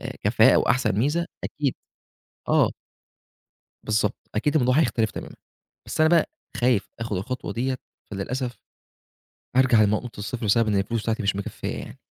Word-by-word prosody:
آآ -, -, -6 dB
كفاءة -, -, +5 dB
وأحسن 125 Hz, -, +2 dB
ميزة، 150 Hz, +8 st, +1 dB, 0.2 s
أكيد 145 Hz, -3 st, -1 dB, 0.7 s
آه. -, -, +4 dB, 1.1 s
بالضبط، 105 Hz, -1 st, +1 dB, 0.2 s
أكيد 145 Hz, +8 st, +1 dB
الموضوع 125 Hz, -3 st, +3 dB
هيختلف 115 Hz, -9 st, +1 dB
تمامًا. -, -, -8 dB, 0.5 s
بس -, -, -5 dB
أنا 155 Hz, -, +5 dB
بقى 170 Hz, -2 st, +4 dB, 0.3 s
خايف 120 Hz, -5 st, +2 dB
آخُد 115 Hz, -3 st, -3 dB
الخطوة 125 Hz, +8 st, -4 dB
ديّة، 130 Hz, +2 st, -1 dB, 0.3 s
فللأسف 120 Hz, +4 st, -3 dB, 1.0 s
أرجع 125 Hz, -4 st, +5 dB
لنقطة 105 Hz, +2 st, 0 dB
الصفر 110 Hz, +3 st, -4 dB
بسبب 110 Hz, +2 st, +3 dB
إن 105 Hz, -, +1 dB
الفلوس 105 Hz, +4 st, -1 dB
بتاعتي 115 Hz, -1 st, -1 dB
مش 100 Hz, 0 st, +1 dB
مكفّية 100 Hz, -, -4 dB
يعني. -, -, -9 dB
115 Hz, 145 wpm, -25 LUFS, 105-130 Hz, 1.1 s, كفاءة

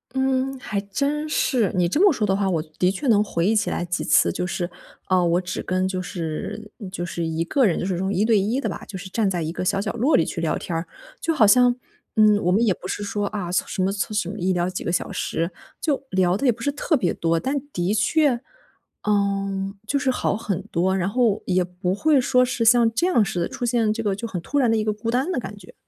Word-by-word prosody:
嗯， 265 Hz, 0 st, 0 dB
还 210 Hz, -5 st, -3 dB
真 280 Hz, +10 st, -2 dB
是。 250 Hz, -8 st, +1 dB
你 180 Hz, -1 st, +2 dB
这 290 Hz, -, 0 dB
么 400 Hz, -5 st, +6 dB
说 225 Hz, -5 st, 0 dB
的 195 Hz, -, +1 dB
话， 195 Hz, -1 st, 0 dB
我 170 Hz, -4 st, 0 dB, 0.2 s
的 180 Hz, -, +4 dB
确 200 Hz, +9 st, -3 dB
能 215 Hz, -4 st, +5 dB
回 170 Hz, -5 st, -1 dB
忆 215 Hz, -, +3 dB
起 205 Hz, -, +1 dB
来 -, -, -2 dB
几 175 Hz, +1 st, -2 dB
次， -, -, +4 dB
就 180 Hz, -, -3 dB
是， 175 Hz, 0 st, -3 dB, 0.4 s
啊， 185 Hz, -1 st, +3 dB
我 175 Hz, +1 st, +2 dB
只 185 Hz, 0 st, -4 dB
跟 185 Hz, +1 st, -1 dB
就 185 Hz, -1 st, -2 dB
是 185 Hz, +4 st, -5 dB
嗯， 200 Hz, -5 st, -7 dB
就 180 Hz, -2 st, -4 dB
是 170 Hz, -1 st, -3 dB
一 160 Hz, 0 st, -1 dB
个 260 Hz, +9 st, +2 dB
人， 185 Hz, -, +2 dB
就 -, -, -2 dB
是 190 Hz, -, -1 dB
这 -, -, -2 dB
种 190 Hz, +2 st, -1 dB
一 200 Hz, -, +2 dB
对 220 Hz, -2 st, +4 dB
一 225 Hz, +8 st, 0 dB
的 -, -, -1 dB
吧， -, -, -7 dB
就 195 Hz, -, -7 dB
是 190 Hz, +1 st, -8 dB
站 205 Hz, +1 st, +1 dB
在 180 Hz, -3 st, -2 dB
一 160 Hz, 0 st, -2 dB
个 180 Hz, -, -4 dB
小 195 Hz, +2 st, +1 dB
角 215 Hz, -, -2 dB
落 265 Hz, +7 st, +2 dB
里 165 Hz, -, +4 dB
去 -, -, -4 dB
聊 165 Hz, -2 st, 0 dB
天 170 Hz, -, -6 dB
儿。 165 Hz, +1 st, -2 dB, 0.3 s
就 330 Hz, -, 0 dB
好 225 Hz, -, +5 dB
像， 245 Hz, +3 st, +5 dB, 0.4 s
嗯， 215 Hz, -1 st, +5 dB
我 180 Hz, -, +1 dB
们 215 Hz, -, +3 dB
也 200 Hz, -, +3 dB
不 185 Hz, -, -9 dB
是 205 Hz, -, -3 dB
说， 205 Hz, 0 st, -2 dB
啊， 200 Hz, -5 st, -4 dB
什 185 Hz, +1 st, -1 dB
么 190 Hz, -, +1 dB
从 205 Hz, +1 st, -3 dB
什 190 Hz, -4 st, 0 dB
么 210 Hz, -, -6 dB
一 185 Hz, +1 st, +1 dB
聊 175 Hz, 0 st, 0 dB
几 185 Hz, -, -5 dB
个 170 Hz, -, -1 dB
小 175 Hz, -, -1 dB
时， 165 Hz, +2 st, -2 dB, 0.3 s
就 290 Hz, -4 st, 0 dB
聊 185 Hz, 0 st, +2 dB
的 280 Hz, -, -2 dB
也 250 Hz, -, +6 dB
不 230 Hz, -, -14 dB
是 285 Hz, -, 0 dB
特 290 Hz, +3 st, 0 dB
别 220 Hz, -, 0 dB
多， 165 Hz, 0 st, 0 dB
但 265 Hz, -, -1 dB, 0.2 s
的 175 Hz, +3 st, 0 dB
确， 250 Hz, +5 st, +2 dB, 0.6 s
呃， 195 Hz, -1 st, 0 dB
就 280 Hz, +5 st, 0 dB
是 275 Hz, -, 0 dB
好 250 Hz, -4 st, 0 dB
很 205 Hz, -6 st, -3 dB
多， 185 Hz, +3 st, +1 dB
然 190 Hz, 0 st, 0 dB
后 230 Hz, -2 st, +1 dB
也 185 Hz, -1 st, +1 dB
不 180 Hz, +1 st, -3 dB
会 295 Hz, +8 st, +3 dB
说 250 Hz, 0 st, +3 dB
是 245 Hz, -2 st, -1 dB
像 230 Hz, 0 st, +5 dB
这 300 Hz, +10 st, +1 dB
样 235 Hz, -, +3 dB
似 180 Hz, -, -2 dB
的， 170 Hz, -, -1 dB
出 245 Hz, -, -4 dB
现 230 Hz, -3 st, +2 dB
这 220 Hz, +1 st, -2 dB
个 205 Hz, -3 st, 0 dB
就 230 Hz, -, -6 dB
很 200 Hz, -6 st, -4 dB
突 285 Hz, -, -3 dB
然 250 Hz, -5 st, +3 dB
的 225 Hz, -, +2 dB
一 215 Hz, -, -1 dB
个 215 Hz, -, +1 dB
孤 225 Hz, +2 st, -3 dB
单 260 Hz, +7 st, 0 dB
的 -, -, -2 dB
感 210 Hz, -4 st, -5 dB
觉。 190 Hz, -3 st, -15 dB
200 Hz, 290 characters per minute, -23 LUFS, 180-235 Hz, 0.6 s, 么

